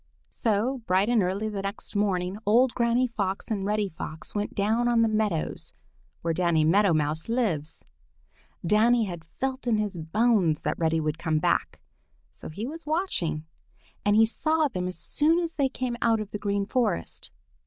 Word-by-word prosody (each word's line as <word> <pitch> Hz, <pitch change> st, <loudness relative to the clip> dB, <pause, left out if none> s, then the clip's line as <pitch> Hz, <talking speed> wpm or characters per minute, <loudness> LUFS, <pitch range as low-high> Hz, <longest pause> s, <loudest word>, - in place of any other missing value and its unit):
So, 235 Hz, +4 st, 0 dB
bright 190 Hz, +4 st, +3 dB
and 240 Hz, -3 st, +4 dB
early 195 Hz, +4 st, -1 dB
the 205 Hz, -2 st, -3 dB
next 195 Hz, +2 st, -6 dB
morning, 195 Hz, -1 st, 0 dB
old 235 Hz, +4 st, +4 dB
Granny 235 Hz, +1 st, +2 dB
Fox 205 Hz, -4 st, -3 dB
and 200 Hz, -3 st, -1 dB
Reddy 210 Hz, 0 st, +1 dB
Fox 160 Hz, -2 st, -8 dB
went 205 Hz, 0 st, -3 dB
down 220 Hz, +4 st, +1 dB
on 235 Hz, -1 st, +4 dB
the -, -, +3 dB
meadows 215 Hz, -, -1 dB, 0.5 s
where 165 Hz, 0 st, +1 dB
Danny 170 Hz, -2 st, +2 dB
Meadow 195 Hz, +5 st, +4 dB
Mouse 155 Hz, +3 st, 0 dB
lives. 195 Hz, -, -1 dB, 0.8 s
Danny 225 Hz, +5 st, +4 dB
had 175 Hz, -5 st, -5 dB
felt 260 Hz, +9 st, -4 dB
in 225 Hz, -2 st, +3 dB
his 205 Hz, -3 st, -2 dB
bones 180 Hz, -1 st, +2 dB
that -, -, -2 dB
Reddy 165 Hz, -1 st, +2 dB
would 155 Hz, 0 st, -2 dB
come 160 Hz, -2 st, 0 dB
back, 155 Hz, -, 0 dB, 0.5 s
so -, -, -10 dB
he 200 Hz, +8 st, -5 dB
was 310 Hz, +3 st, -6 dB
watching, 295 Hz, -, -1 dB, 0.6 s
and 205 Hz, 0 st, +3 dB
he 225 Hz, +1 st, +7 dB
saw 310 Hz, +7 st, +1 dB
them 180 Hz, -8 st, -3 dB
as 180 Hz, -, -5 dB
soon 300 Hz, -, +2 dB
as 335 Hz, -2 st, -1 dB
they 275 Hz, -2 st, +1 dB
came 255 Hz, -2 st, -3 dB
out 225 Hz, -1 st, +3 dB
of 210 Hz, -1 st, -6 dB
the 210 Hz, -, -4 dB
Green 200 Hz, -1 st, -1 dB
Forest. 225 Hz, -, -1 dB
210 Hz, 175 wpm, -27 LUFS, 175-235 Hz, 0.8 s, he